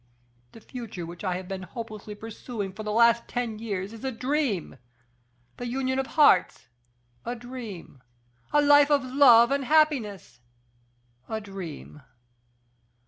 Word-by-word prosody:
The 225 - -13
future 225 -8 -7
which 170 +3 -10
I 185 -2 -1
have 185 0 -6
been 190 0 -5
hopelessly 215 +2 -8
pursuing 215 -2 -6
for 215 - -8
the 210 0 -4
last 235 +1 +4
ten 235 -3 -3
years 200 -2 -4
is 225 - -11
a 265 - -1
dream! 250 - -2 0.8
the 245 - -5
union 260 +1 -1
of 265 - -2
hearts, 185 - +4 0.5
a 240 - -4
dream! 230 - -9 0.5
a 295 0 +4
life 290 0 +6
of 285 -2 +3
love 255 -2 +6
and 280 0 +1
happiness, 260 - +1 0.9
a 220 - -2
dream! 190 -7 -9
230 Hz, 140 wpm, -26 LUFS, 195-260 Hz, 0.9 s, life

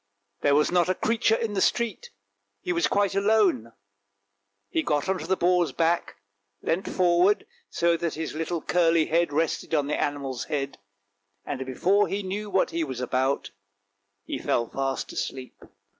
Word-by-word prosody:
There 140 -1 +3
was 150 +3 +3
not 180 0 +3
a 185 - +2
creature 225 +1 +2
in 225 -2 -2
the 195 - 0
street; 235 - 0 0.5
he 360 - -2
was 345 0 +2
quite 200 -1 +1
alone, 195 - +2 1.0
he 160 - 0
got 150 0 0
on 190 -1 0
to - - -6
the 190 +1 +1
boar's 175 -1 +2
back, 165 +1 0 0.5
leant 175 +4 -1
forward 180 - +3 0.2
so 170 0 +2
that 165 -1 -2
his 160 0 -4
little 165 +1 -3
curly 165 -2 +3
head 170 0 +1
rested 160 +1 -1
on 145 -2 +2
the 150 - -1
animal's 140 -4 -2
head, 140 -5 -3 0.7
and 135 -2 -3
before 195 +10 +2
he 200 +3 -3
knew 205 +3 -4
what 190 -1 +1
he 165 0 -1
was 130 -5 -5
about 130 +2 -1 0.7
he - - -4
fell 120 -1 0
fast 135 +1 -3
asleep. 130 -1 -4
170 Hz, 165 wpm, -26 LUFS, 145-195 Hz, 1.0 s, There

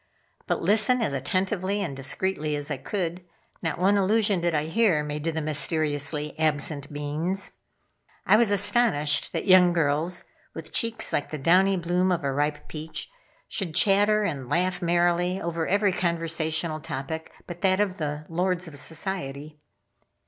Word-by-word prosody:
But - - -1
listen 220 +4 +4
as 215 -11 -1
attentively 185 +8 -1
and 150 -7 -4
discreetly 150 +3 -1
as 145 +1 -3
I 145 - -1
could, 175 +4 -3 0.4
not 165 -3 -2
one 195 +3 +3
allusion 200 -1 +2
did 170 -1 0
I 150 - +1
hear 165 -2 +2
made 150 0 -5
to 165 - +1
the 160 0 -3
mysteriously 150 0 +1
absent 150 -2 0
beings. 150 +6 -2 0.7
I - - +6
was 225 -1 +4
astonished 205 -7 +2
that - - -3
young 185 -2 +6
girls, 165 +2 0 0.3
with - - -8
cheeks 230 -1 -1
like 145 - -1
the 155 - -4
downy 185 +7 +3
bloom 180 +2 +1
of 175 -4 -1
a 135 -1 -1
ripe 145 +1 -1
peach, 155 - -7 0.4
should 170 -6 -4
chatter 205 +1 +4
and 140 -10 -3
laugh 180 +4 0
merrily 175 +1 +1
over 170 -2 -2
every 200 0 +2
conversational 165 -2 -1
topic 150 +3 -6
but 175 -1 -9
that 190 0 +2
of 195 -3 0
the 150 0 -3
lords 180 +1 -1
of 155 - -10
society. 150 -3 -5
170 Hz, 155 wpm, -26 LUFS, 150-190 Hz, 0.7 s, I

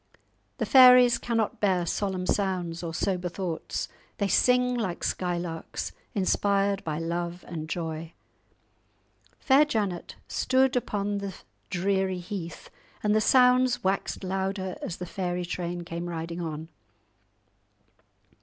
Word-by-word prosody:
The - - -1
fairies 250 -2 +8
cannot 230 -3 -1
bear 185 -4 +2
solemn 185 +1 -2
sounds 180 -4 -1
or 170 -2 -4
sober 180 +1 -1
thoughts; 175 -2 -4 0.3
they 200 - +1
sing 250 +5 +3
like 215 -8 -2
skylarks, 175 -2 -3 0.2
inspired 200 0 +1
by 155 -2 -3
love 170 +1 -3
and 155 -2 -6
joy. 160 0 -4 1.2
Fair 275 +2 +5
Janet 205 - -2
stood 260 0 +2
upon 205 -4 -1
the 200 -2 -5 0.3
dreary 190 0 0
heath, 175 -2 -7 0.3
and 210 0 +3
the 215 - +3
sounds 250 +1 +4
waxed 195 +1 -1
louder 190 0 -2
as 170 - -4
the 180 - -5
fairy 180 -1 -3
train 175 0 -4
came 170 +1 -5
riding 170 +1 -4
on. 160 -1 -5
185 Hz, 120 wpm, -27 LUFS, 175-210 Hz, 1.2 s, fairies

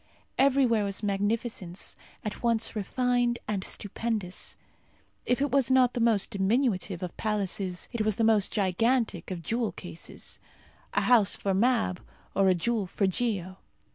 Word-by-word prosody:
Everywhere 265 -5 +4
was 200 +1 -3
magnificence, 205 -2 -1 0.3
at 210 - -4
once 230 -1 +1
refined 245 +3 +1
and 205 -3 -2
stupendous; 205 -2 -3 0.7
if 250 +2 +1
it 285 - -1
was 270 -2 +3
not 255 -2 +4
the - - -2
most 230 -4 +2
diminutive 195 -3 0
of 180 - -5
palaces, 195 -4 -2
it 235 - -1
was 215 -2 +1
the 225 - 0
most 220 -3 +4
gigantic 215 0 +1
of 180 -3 -5
jewel 230 +5 -1
cases. 175 -2 -9 0.6
A - - +3
house 225 -5 +4
for 195 - -1
Mab 220 -3 +2 0.3
or 195 0 +3
a 185 - +5
jewel 215 +2 0
for 195 - 0
Geo. 190 -2 -1
215 Hz, 145 wpm, -28 LUFS, 190-235 Hz, 0.7 s, a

